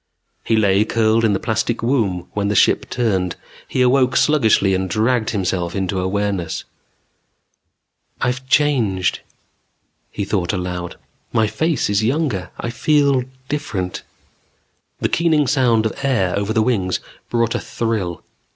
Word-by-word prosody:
He 115 - +1
lay 100 -2 +3
curled 110 0 +2
in 110 -2 +3
the 95 - 0
plastic 110 +1 -1
womb 105 -9 0
when 100 -1 -1
the 105 - 0
ship - - +3
turned. 95 -7 0 0.3
He 130 - +1
awoke 130 0 +3
sluggishly 110 -9 +3
and 95 0 -1
dragged 110 +3 +1
himself 90 -3 -2
into 95 -1 -1
awareness. 95 -2 -2 1.6
"I've 130 +1 -2
changed," 115 -13 +2 0.9
he 100 - -4
thought 95 -2 -1
aloud. 90 -2 -4 0.4
"My 110 -2 +2
face 155 +6 0
is 105 +1 +1
younger; 120 - -1
I 115 - -3
feel 140 0 +2 0.2
different." 115 - -3 1.0
The - - +2
keening 160 -3 +2
sound 120 -4 +2
of 110 - 0
air 110 -10 +1
over 100 +1 -1
the 110 -1 +2
wings 95 -7 0 0.3
brought 115 -1 +1
a - - -1
thrill. 110 -7 -3
110 Hz, 135 wpm, -20 LUFS, 95-125 Hz, 1.6 s, lay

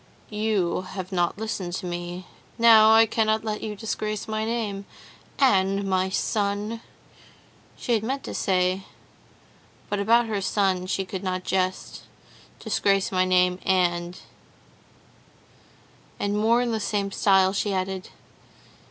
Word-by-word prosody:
You 210 -5 0
have 185 0 -7
not 175 -1 0
listened 200 -5 -4
to 185 - -4
me. 175 +1 -5 0.3
Now 225 -2 +7
I 225 +1 +7
cannot 220 -1 0
let 215 -1 -3
you 215 -1 -4
disgrace 215 0 -4
my 215 0 -2
name,—'" 215 -4 -3 0.5
"and 195 -6 +3
my 190 0 +1
son," 205 +3 -1 1.0
she 245 - -1
had 220 - +2
meant 270 +4 -3
to - - -6
say, 185 0 +1 1.1
but 205 - 0
about 230 +4 +4
her 215 -3 -2
son 190 -2 0
she 195 +1 -1
could 185 0 -6
not 185 -1 -2
jest,—"'disgrace 190 +1 -2
my 185 -1 +2
name, 180 0 +2
and'—and 175 -1 0 2.2
more 230 +3 +3
in 240 - -1
the 220 - -1
same 200 -1 -2
style," 190 -1 +3
she 205 +1 -1
added. 190 0 -3
195 Hz, 125 wpm, -25 LUFS, 185-220 Hz, 2.2 s, Now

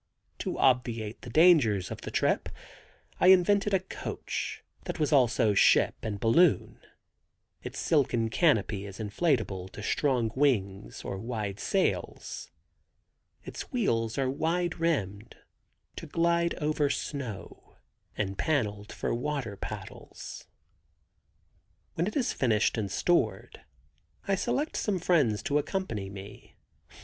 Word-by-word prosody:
To - - -3
obviate 115 -4 +1
the 125 - -9
dangers 125 - +4
of - - -6
the - - -6
trip - - 0 0.7
I - - +4
invented 195 +2 +5
a 190 - +3
coach, 185 - -5 0.2
that - - -4
was 150 0 +1
also 120 -5 +4
ship 100 - +5
and 105 -2 -4
balloon. 150 - +3 0.8
Its - - -7
silken 120 -7 +1
canopy 110 - +2
is 100 0 -9
inflatable 105 - -1
to 105 - -8
strong 125 -3 +1
wings 105 -8 0
or 95 - -4
wide 105 -3 -4
sails. 195 - -2 0.9
Its - - -8
wheels 115 - 0
are 135 -1 +1
wide 165 +5 -1
rimmed, 110 - -1 0.6
to - - -7
glide 170 0 +1
over 150 -1 0
snow, 135 -8 -5 0.4
and 95 -2 -2
paneled 105 -9 -1
for - - -2
water 125 -3 -3
paddles. - - -8 1.5
When 170 +3 -1
it 210 - -4
is 265 -5 +1
finished 110 -4 +2
and 105 -3 -2
stored 175 - 0 0.7
I 200 - +2
select 275 - -1
some 205 -3 0
friends 145 - +2
to 145 +1 +1
accompany 145 - -3
me. 100 0 -11
125 Hz, 120 wpm, -29 LUFS, 105-170 Hz, 1.5 s, invented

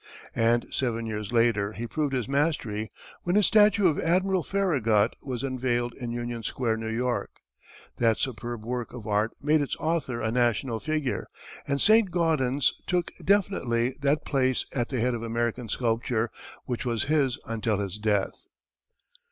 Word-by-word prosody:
And 115 +1 +3
seven 115 -3 -1
years 105 -2 -4
later 115 -3 +2
he 115 - -5
proved 145 +5 -1
his 125 -3 -1
mastery 135 -7 -1 0.3
when 175 +1 0
his 210 -1 +5
statue 210 -2 +5
of 155 - +1
Admiral 185 +2 +2
Farragut 130 - +2
was 125 -3 -4
unveiled 125 -2 -1
in 120 -3 -6
Union 120 0 -4
Square, 115 +1 -1
New 110 0 -4
York. 120 +2 -1 0.7
That 115 -2 +3
superb 120 -2 -4
work 120 0 -3
of 120 -4 -8
art 105 +1 +1
made 150 +1 +3
its 145 - -2
author 155 -7 -1
a 110 -1 -1
national 120 -1 +1
figure, 155 -2 -2 0.4
and 140 0 0
Saint 215 +1 +5
Gaudens 150 -6 +2
took 175 -1 0
definitely 130 -12 +2
that 145 +2 +1
place 130 -3 +1
at 120 -3 -1
the 130 - -1
head 125 +1 +1
of 115 - -3
American 115 0 -2
sculpture 115 0 0 0.3
which 120 -2 -3
was 115 -4 0
his 140 -4 +1
until 110 -2 -1
his 100 0 -4
death. 105 -2 -1
120 Hz, 160 wpm, -27 LUFS, 115-145 Hz, 0.7 s, his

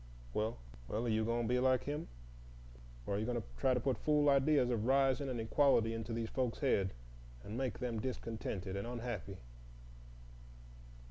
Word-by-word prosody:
Well—well, 65 - -3
are - - 0
you 110 0 +2
going 115 +1 0
to - - -1
be 125 +2 +2
like 130 -1 +3
him, 150 +3 -3 1.0
or - - -2
are 100 - 0
you 110 - -1
going 120 -1 0
to - - -9
try 130 -1 +3
to - - +1
put 130 +1 0
fool 150 -1 +3
ideas 140 -2 +4
of 115 -1 0
rising 135 +1 +3
and 125 -2 -2
equality 115 -1 +3
into 115 0 -4
these 115 0 -2
folks' 125 -3 -1
heads, 100 -9 +1 0.5
and 105 - -6
make 130 -1 -2
them 120 -3 -2
discontented 110 -6 -4
and 100 +3 -3
unhappy?" 115 -5 -4
120 Hz, 175 wpm, -36 LUFS, 110-130 Hz, 1.0 s, ideas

